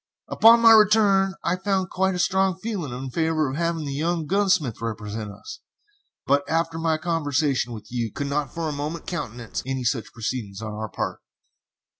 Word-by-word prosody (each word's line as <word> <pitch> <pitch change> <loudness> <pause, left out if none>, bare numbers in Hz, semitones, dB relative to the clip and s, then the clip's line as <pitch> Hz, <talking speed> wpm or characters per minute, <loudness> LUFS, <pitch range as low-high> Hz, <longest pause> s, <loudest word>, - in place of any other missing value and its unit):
Upon 230 +1 +6
my 230 -1 +8
return 205 -3 +5
I 180 - 0
found 190 -1 -1
quite 190 0 +1
a - - -2
strong 190 0 +1
feeling 190 - -4
in 130 +1 -6
favor 160 -2 0
of - - -5
having 165 -1 -1
the 140 - -4
young 165 +3 -1
gunsmith 185 - +1
represent 110 -1 -4
us, 435 - -10 0.7
but, 140 +1 +3
after 165 0 0
my 160 -1 +1
conversation 145 -6 0
with 110 -2 -8
you, 120 -3 -2
could 145 - -4
not 140 -2 -2
for 165 -1 -3
a - - -2
moment 150 +3 -4
countenance 120 - -5
any 130 0 -3
such 115 -1 -1
proceedings 110 -4 -4
on 110 -1 -5
our 110 0 -5
part." - - -4
155 Hz, 180 wpm, -24 LUFS, 125-185 Hz, 0.7 s, my